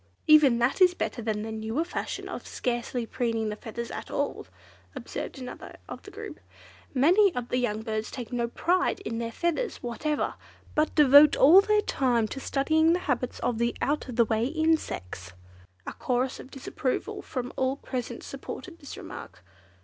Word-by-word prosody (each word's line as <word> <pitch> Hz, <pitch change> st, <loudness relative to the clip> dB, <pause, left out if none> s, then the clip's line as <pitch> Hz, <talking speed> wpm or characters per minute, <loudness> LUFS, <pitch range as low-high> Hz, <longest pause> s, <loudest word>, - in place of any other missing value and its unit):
"Even 300 Hz, -6 st, +7 dB
that 245 Hz, +9 st, +1 dB
is 360 Hz, -1 st, +6 dB
better 240 Hz, -, -3 dB
than 215 Hz, -1 st, -2 dB
the 220 Hz, -, -5 dB
newer 220 Hz, +7 st, -2 dB
fashion -, -, -4 dB
of -, -, -7 dB
scarcely 240 Hz, 0 st, -2 dB
preening 225 Hz, -2 st, -1 dB
the 210 Hz, -, -3 dB
feathers 235 Hz, +2 st, -6 dB
at -, -, -6 dB
all," -, -, -2 dB, 0.5 s
observed -, -, -6 dB
another 255 Hz, -1 st, -9 dB
of -, -, -8 dB
the -, -, -12 dB
group. -, -, -8 dB, 0.5 s
"Many 360 Hz, +10 st, +5 dB
of 245 Hz, -1 st, -4 dB
the 250 Hz, -, +1 dB
young 220 Hz, -3 st, -1 dB
birds 220 Hz, -1 st, -3 dB
take 245 Hz, -2 st, -7 dB
no 235 Hz, -1 st, 0 dB
pride 360 Hz, +9 st, +1 dB
in 230 Hz, +1 st, -4 dB
their 230 Hz, 0 st, -3 dB
feathers 345 Hz, -, -2 dB
whatever, 290 Hz, +6 st, -1 dB, 0.4 s
but 305 Hz, 0 st, +1 dB
devote 290 Hz, 0 st, +8 dB
all 330 Hz, +8 st, +8 dB
their 425 Hz, +1 st, +3 dB
time 245 Hz, -, +1 dB
to 270 Hz, -, -5 dB
studying 315 Hz, +5 st, +2 dB
the 355 Hz, -, +1 dB
habits 250 Hz, -2 st, -1 dB
of 235 Hz, -2 st, -1 dB, 0.2 s
out 290 Hz, -1 st, -1 dB
of 245 Hz, -, -5 dB
the 235 Hz, -1 st, +5 dB
way 220 Hz, +1 st, +1 dB
insects." 285 Hz, -, -1 dB, 0.5 s
A -, -, -5 dB
chorus 255 Hz, +1 st, -1 dB
of -, -, -10 dB
disapproval 265 Hz, -1 st, -3 dB
from 250 Hz, -3 st, -5 dB
all 260 Hz, +1 st, +1 dB
present 255 Hz, -3 st, -5 dB
supported 335 Hz, -2 st, -8 dB
this 285 Hz, -, -9 dB
remark. -, -, -10 dB
255 Hz, 170 wpm, -27 LUFS, 235-305 Hz, 0.5 s, devote